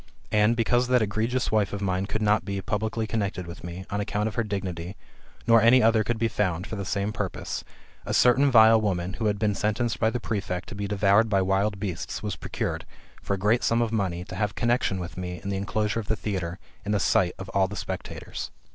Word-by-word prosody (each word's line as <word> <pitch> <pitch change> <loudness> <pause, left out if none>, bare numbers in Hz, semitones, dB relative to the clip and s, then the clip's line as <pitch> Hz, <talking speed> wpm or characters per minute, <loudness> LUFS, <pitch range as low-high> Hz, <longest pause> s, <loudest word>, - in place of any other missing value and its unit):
And, 105 +1 +4
because 120 +2 +2
that 125 -2 +3
^regions 115 +5 -1
wife 105 -3 +1
of 100 - -3
mine 95 -1 -1
could 110 +1 -2
not 105 +1 +3
be 100 -1 -3
[publicly 110 +3 -2
connected 100 -4 -2
with 85 +1 -9
mej, 90 +2 -7
on 100 +1 -1
account 105 0 -1
of 110 - -4
her 115 - 0
dignity, 95 -3 -4 0.5
nor 115 -1 +6
any 125 +3 +6
other 110 -1 +4
could 120 +2 -1
be 115 +1 +1
found, 90 -4 -1
[for 110 - -6
the 100 -2 -4
same 100 +2 -1
purpose], 105 -5 -4 0.4
a - - -5
certain 130 +3 +5
vile 110 -2 +7
woman, 95 -3 -1
who 110 - -1
had 105 -1 +1
been 105 0 +1
sentenced 105 +3 -1
by 110 - +3
the 125 - -2
prefect 95 -5 -3
to - - -7
be 100 -1 -3
devoured 105 +2 +3
by 100 -2 +3
wild 95 +2 +1
beasts, 95 -5 -4
was - - -2
procured, - - -3 0.4
for 100 - -1
a - - -6
great 105 +5 +2
sura 115 +1 +3
of 115 - -2
money, 95 -5 -1
to - - -9
have 105 +1 -1
con 120 - 0
nexion 120 -5 +1
with 90 -1 -6
me 90 -1 -5
in 100 - -4
the 100 - -1
enclosure 105 +3 -1
of 105 - -6
the 110 - +1
theatre, 95 -5 -3 0.3
in 105 - -1
the 105 - +2
sight 90 -1 +2
of 95 - -7
all 95 -1 +2
the 100 - -7
spectators. - - -5
105 Hz, 235 wpm, -26 LUFS, 95-110 Hz, 0.5 s, vile